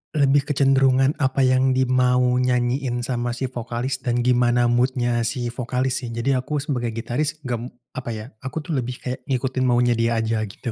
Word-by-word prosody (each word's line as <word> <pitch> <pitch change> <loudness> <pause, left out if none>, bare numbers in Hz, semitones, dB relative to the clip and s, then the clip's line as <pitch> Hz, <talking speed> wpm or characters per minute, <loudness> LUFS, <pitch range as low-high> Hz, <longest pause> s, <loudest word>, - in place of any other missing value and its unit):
lebih 140 0 +3
kecenderungan 135 -1 +3
apa 130 -1 +1
yang 130 0 +3
di 130 - +3
mau 125 0 +3 0.2
nyanyiin 125 0 0
sama 120 -1 -2
si 130 +1 -3
vokalis 120 +2 -3
dan 120 -1 -1
gimana 120 -1 +3
mood-nya 120 0 +1
si 120 0 -2
vokalis 125 +1 -1
sih. 125 - -6
Jadi 115 +4 -1
aku 130 +3 -1
sebagai 125 -6 -2
gitaris, 125 +7 -2
gem 120 -2 -3 0.2
apa 130 -2 -6
ya, 110 0 -6
aku 135 +5 -5
tuh 145 -3 -1
lebih 125 0 -4
kayak, 130 +1 -5
ngikutin 130 -1 0
maunya 120 0 +3
dia 115 0 +1
aja 115 0 0
gitu. 120 +5 -6
125 Hz, 180 wpm, -22 LUFS, 120-130 Hz, 0.2 s, lebih